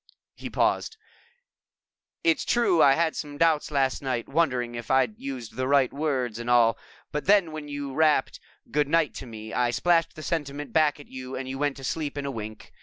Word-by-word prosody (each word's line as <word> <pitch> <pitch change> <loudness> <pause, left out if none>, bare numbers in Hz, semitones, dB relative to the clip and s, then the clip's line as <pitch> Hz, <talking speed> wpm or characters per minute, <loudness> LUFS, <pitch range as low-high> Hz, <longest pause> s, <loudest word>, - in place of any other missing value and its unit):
He - - -8
paused. 445 - 0 1.3
"It's 330 -4 +3
true 235 -9 +3
I 135 - +7
had 165 +1 +1
some 145 -1 -6
doubts 160 -1 +2
last 135 -3 0
night, 130 -4 -2
wondering 125 -6 0
if 120 -1 -7
I'd 130 -5 +2
used 130 -5 -6
the 130 0 -1
right 140 -2 +3
words 130 -6 -1
and 120 +1 -5
all, 120 -2 +5 0.4
but 150 - -3
then 195 -5 +4
when 155 -1 -7
you 145 -1 -5
rapped 155 -2 +2 0.3
'Good 145 0 +2
night' 160 -1 +2
to 130 - -8
me, 110 -1 -8
I 125 -1 +2
splashed 165 +7 +2
the 155 - -9
sentiment 145 -4 -3
back 155 -2 +3
at 145 - -12
you 130 0 -7
and 130 0 -4
went 145 -1 0
to 135 - -10
sleep 145 +1 -3
in 140 - -3
a 140 - -2
wink. 110 -3 -8
140 Hz, 195 wpm, -26 LUFS, 125-155 Hz, 1.3 s, I